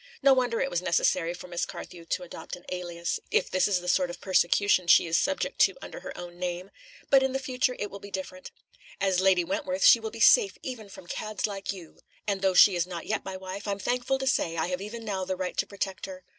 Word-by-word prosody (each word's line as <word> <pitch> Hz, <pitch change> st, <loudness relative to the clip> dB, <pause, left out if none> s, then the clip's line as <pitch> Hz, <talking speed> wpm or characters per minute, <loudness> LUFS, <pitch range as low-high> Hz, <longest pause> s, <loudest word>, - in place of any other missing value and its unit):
No 275 Hz, -, +7 dB
wonder 245 Hz, -3 st, +1 dB
it 270 Hz, -, -1 dB
was 175 Hz, -, 0 dB
necessary 170 Hz, -1 st, +1 dB
for 180 Hz, +1 st, -9 dB
Miss 175 Hz, 0 st, -3 dB
Carthew 170 Hz, -2 st, -7 dB
to 180 Hz, -, -2 dB
adopt 170 Hz, -2 st, -8 dB
an 175 Hz, -, -16 dB
alias, 175 Hz, -2 st, -3 dB
if -, -, +1 dB
this 185 Hz, -1 st, +3 dB
is 190 Hz, -3 st, +1 dB
the 180 Hz, -, -9 dB
sort 180 Hz, 0 st, +2 dB
of 175 Hz, -, -7 dB
persecution 185 Hz, 0 st, +2 dB
she -, -, +7 dB
is 165 Hz, 0 st, -1 dB
subject 285 Hz, +8 st, 0 dB
to -, -, +5 dB
under -, -, -8 dB
her -, -, -8 dB
own 175 Hz, 0 st, -9 dB
name. 180 Hz, +1 st, -4 dB, 0.4 s
But 270 Hz, -1 st, +7 dB
in 265 Hz, 0 st, 0 dB
future 255 Hz, -1 st, -1 dB
it 205 Hz, -, -4 dB
will 200 Hz, -, -8 dB
be 200 Hz, -, -10 dB
different. 185 Hz, -1 st, -6 dB, 0.5 s
As 190 Hz, -2 st, +2 dB
Lady 190 Hz, -2 st, +4 dB
Wentworth 285 Hz, -, -1 dB
she -, -, +8 dB
will 445 Hz, -, -4 dB
be -, -, -10 dB
safe 435 Hz, -5 st, +5 dB
even 230 Hz, -6 st, -6 dB
from 190 Hz, -, -12 dB
cads 215 Hz, +4 st, -3 dB
like 200 Hz, -2 st, -3 dB
you; 180 Hz, -5 st, -11 dB, 0.3 s
and 200 Hz, -2 st, -1 dB
though 190 Hz, -1 st, +2 dB
she 195 Hz, +1 st, +8 dB
is 175 Hz, 0 st, 0 dB
not 175 Hz, -2 st, -6 dB
yet 215 Hz, -, -2 dB
my 190 Hz, -1 st, -6 dB
wife, 190 Hz, +2 st, -7 dB
I'm 200 Hz, -1 st, -1 dB
thankful 245 Hz, +6 st, -1 dB
to 265 Hz, -, -4 dB
say 165 Hz, -10 st, +1 dB
I 160 Hz, +2 st, 0 dB
have 180 Hz, +1 st, -3 dB
even 225 Hz, +3 st, -7 dB
now 195 Hz, -3 st, -2 dB
the 185 Hz, 0 st, -2 dB
right 185 Hz, 0 st, -4 dB
to -, -, 0 dB
protect 195 Hz, -1 st, -4 dB
her. 185 Hz, -1 st, -9 dB
190 Hz, 245 wpm, -27 LUFS, 180-220 Hz, 0.5 s, she